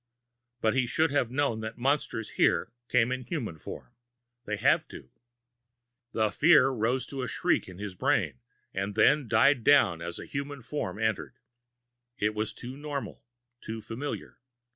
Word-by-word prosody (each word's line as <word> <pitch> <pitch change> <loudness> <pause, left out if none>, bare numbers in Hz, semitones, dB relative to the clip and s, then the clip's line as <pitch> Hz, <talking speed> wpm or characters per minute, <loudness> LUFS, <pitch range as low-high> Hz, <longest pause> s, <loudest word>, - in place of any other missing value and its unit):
But 110 - +3
he 130 -2 +1
should 160 +5 +1
have 140 -5 +1
known 130 -3 0
that 110 +1 -6
monsters 130 -4 0
here - - +2 0.2
came 125 0 +3
in 130 0 -2
human 120 - -4
form - - -9 0.5
they'd 105 0 -3
have 155 +5 +3
to. - - -12 1.0
The 110 -1 +1
fear 155 +1 +6
rose 125 +1 0
to 135 -1 -5
a 125 - -2
shriek - - 0
in 90 - -11
his 100 -1 -5
brain, 75 -7 0 0.3
and 100 +1 -3
then 140 +5 +4
died 120 +3 +4
down 110 - +5
as 85 +1 -5
the - - -7
human 140 -1 -5
form 110 -8 -4
entered. 110 -1 -1 0.8
It 105 +1 +1
was 110 0 -2
too 125 +2 -8
normal 145 -1 -5 0.4
too 110 0 -5
familiar. 115 +6 -6
120 Hz, 160 wpm, -29 LUFS, 110-140 Hz, 1.0 s, fear